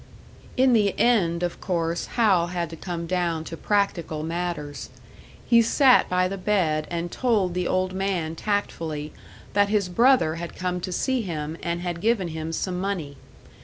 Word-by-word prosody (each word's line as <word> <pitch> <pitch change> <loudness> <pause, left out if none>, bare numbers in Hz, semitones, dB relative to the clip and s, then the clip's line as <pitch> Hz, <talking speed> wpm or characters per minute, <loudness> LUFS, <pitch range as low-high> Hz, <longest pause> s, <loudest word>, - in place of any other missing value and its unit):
In 260 0 +5
the 205 -4 +2
end, 180 -8 +2
of 175 - -3
course, 170 -2 -1
Hal 195 -7 +4
had 175 -2 -3
to - - -6
come 170 0 -5
down 170 -2 -1
to 165 - -7
practical 175 -5 -1
matters. 165 -4 -4 0.6
He 235 -1 +6
sat 255 +3 +4
by 180 0 +2
the 195 +1 -5
bed 170 -7 +1
and 170 0 -3
told 215 -8 +1
the 180 0 -1
old 185 0 0
man 185 -4 -2
tactfully 160 -7 -3 0.4
that 205 0 +3
his 205 -3 +1
brother 230 -5 +3
had 170 0 -6
come 180 -1 -2
to 185 - -4
see 260 +7 0
him 160 -5 -4
and 170 0 -2
had 175 -1 -4
given 215 -5 +1
him 160 0 -5
some 180 +2 -2
money. 180 -8 -3
180 Hz, 165 wpm, -25 LUFS, 165-200 Hz, 0.6 s, He